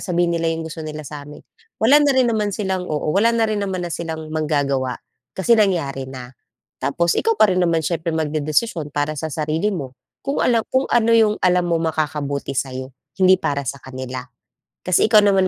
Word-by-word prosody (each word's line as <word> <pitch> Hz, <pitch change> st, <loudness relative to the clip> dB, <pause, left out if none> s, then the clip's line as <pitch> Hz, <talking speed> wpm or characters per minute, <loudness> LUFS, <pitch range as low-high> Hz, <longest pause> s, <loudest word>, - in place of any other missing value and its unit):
sabihin 175 Hz, -2 st, 0 dB
nila 165 Hz, -1 st, 0 dB
'yong 165 Hz, 0 st, -2 dB
gusto 160 Hz, 0 st, -7 dB
nila 155 Hz, -1 st, -6 dB
sa 145 Hz, 0 st, -8 dB
amin, 150 Hz, -, -12 dB, 0.3 s
wala 275 Hz, +7 st, +5 dB
na 290 Hz, -1 st, +4 dB
rin 260 Hz, -, +5 dB
naman 210 Hz, -2 st, -1 dB
silang 190 Hz, -3 st, -2 dB
oo 150 Hz, 0 st, -1 dB
wala 230 Hz, +4 st, +3 dB
na 225 Hz, -, +3 dB
rin 215 Hz, -2 st, -1 dB
naman 190 Hz, -3 st, -2 dB
na 170 Hz, -, -4 dB
silang 160 Hz, -2 st, -5 dB
magagawa 140 Hz, -5 st, 0 dB, 0.4 s
kasi 190 Hz, +5 st, +2 dB
nangyari 145 Hz, -10 st, 0 dB
na. 130 Hz, -1 st, -9 dB, 0.5 s
Tapos 170 Hz, +4 st, +1 dB
ikaw 455 Hz, -1 st, +1 dB
pa 210 Hz, -3 st, +5 dB
rin 185 Hz, -, +1 dB
naman 165 Hz, -3 st, +1 dB
siyempre 165 Hz, -1 st, -1 dB
magdedesisyon 155 Hz, +3 st, -1 dB
para 145 Hz, +1 st, 0 dB
sa 160 Hz, -, -3 dB
sarili 155 Hz, +5 st, -1 dB
mo, 135 Hz, -6 st, -5 dB, 0.3 s
kung 275 Hz, +1 st, -1 dB
alam 230 Hz, -3 st, +2 dB
kung 260 Hz, +1 st, +2 dB
ano 230 Hz, -1 st, +3 dB
yung 220 Hz, -2 st, +4 dB
alam 180 Hz, -1 st, +3 dB
mo 170 Hz, -, +2 dB
makakabuti 145 Hz, -3 st, -2 dB
sayo, 130 Hz, 0 st, -4 dB, 0.2 s
hindi 185 Hz, 0 st, +6 dB
para 140 Hz, -5 st, -1 dB
sa 140 Hz, -, -3 dB
kanila. 130 Hz, -1 st, -6 dB, 0.6 s
Kasi 185 Hz, +3 st, +3 dB
ikaw 215 Hz, -1 st, +6 dB
naman 195 Hz, -2 st, +4 dB
165 Hz, 195 wpm, -21 LUFS, 145-195 Hz, 0.6 s, hindi